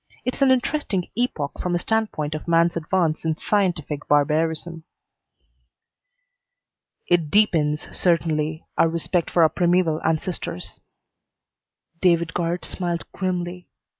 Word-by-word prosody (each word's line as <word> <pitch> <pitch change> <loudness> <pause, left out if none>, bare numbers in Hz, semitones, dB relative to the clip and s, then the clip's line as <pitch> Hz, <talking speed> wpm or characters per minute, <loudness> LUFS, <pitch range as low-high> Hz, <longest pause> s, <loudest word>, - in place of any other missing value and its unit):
It's 255 - -3
an 275 - +5
interesting 255 - 0
epoch 205 - -2
from 180 - -1
the - - +3
standpoint 190 -7 -1
of 155 - -6
man's 170 0 +3
advance 165 -1 0
in 160 -1 -1
scientific 170 -9 -1
barbarism." 160 +3 +1 2.2
"It 170 -4 +2
deepens, 155 -7 +2
certainly, 160 -2 0
our 165 - +5
respect 170 +1 -1
for 170 - +4
our 160 - +6
primeval 175 -2 +1
ancestors." 160 - -3 1.2
David 170 -2 +3
Guard 175 0 -1
smiled 175 -2 -3
grimly. 180 -1 -3
170 Hz, 110 wpm, -23 LUFS, 155-180 Hz, 2.2 s, our